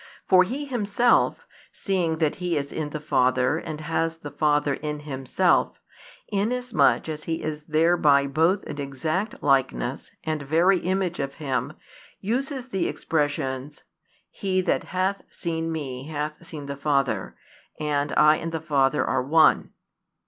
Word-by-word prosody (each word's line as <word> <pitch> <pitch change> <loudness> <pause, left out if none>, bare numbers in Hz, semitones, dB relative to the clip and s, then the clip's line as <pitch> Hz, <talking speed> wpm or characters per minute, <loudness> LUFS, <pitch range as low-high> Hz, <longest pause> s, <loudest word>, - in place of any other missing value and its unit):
For 185 -1 +6
He 265 +10 -4
Himself, 240 -2 +2 0.3
seeing 175 -5 -1
that 155 +1 0
He 180 -3 -1
is 140 -1 -3
in 155 -2 -3
the 150 - -5
Father 130 0 +2
|283 - - -8
and 155 0 -5
has 165 +1 -1
the 145 -3 -8
Father 145 0 +2
in 150 +1 -4
Himself, 135 -3 +1 0.5
inasmuch 235 +2 +1
as 155 -1 -5
He 165 -1 -3
is 150 -1 -4
thereby 155 -3 +4
both 165 +8 +2
an 145 0 -6
Exact 155 - -3
Likeness 130 - +1
and 155 -1 -2
Very 170 +6 +3
Image 185 -1 -1
of 140 0 -3
Him, 135 -2 -2 0.5
uses 260 +4 -2
the 195 -6 0
expressions: 145 -2 -2 0.5
He 190 -2 -1
that - - 0
hath 190 +2 -1
seen 165 -1 -3
Me 135 -4 -5
hath 150 +2 -5
seen 150 -3 -7
the 140 0 -5
Father: 135 -8 0 0.4
I 150 +1 +3
and 165 - -4
the 160 - -2
Father 145 -3 +1
are 130 - +1
One. 155 +4 +4
155 Hz, 145 wpm, -25 LUFS, 140-180 Hz, 0.5 s, For